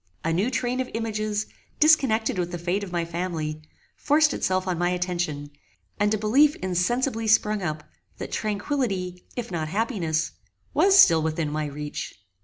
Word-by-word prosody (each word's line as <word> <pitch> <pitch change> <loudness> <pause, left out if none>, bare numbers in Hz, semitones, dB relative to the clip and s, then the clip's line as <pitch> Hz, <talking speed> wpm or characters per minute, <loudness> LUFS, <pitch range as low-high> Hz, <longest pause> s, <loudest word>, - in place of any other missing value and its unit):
A 165 - 0
new 195 +8 +1
train 250 0 -1
of 260 - -2
images, 215 -2 -2 0.3
disconnected 260 - +3
with 175 0 -2
the 175 - -3
fate 175 +4 -1
of 190 - -7
my 170 -1 -1
family, 165 -3 -3 0.3
forced 300 0 +3
itself 185 0 -1
on 180 -2 -1
my 175 0 +2
attention, 175 -5 -2 0.5
and 205 0 +2
a 215 - +2
belief 270 +8 +4
insensibly 225 +6 -1
sprung 215 -1 +3
up, 155 -3 -3 0.3
that - - -6
tranquillity, 200 -5 -2
if 235 -5 -5
not 160 -3 -2
happiness, 175 -5 -1 0.4
was 390 0 +5
still 165 - +7
within 155 -1 -1
my 155 0 -2
reach. 145 +1 -6
185 Hz, 160 wpm, -25 LUFS, 170-225 Hz, 0.5 s, still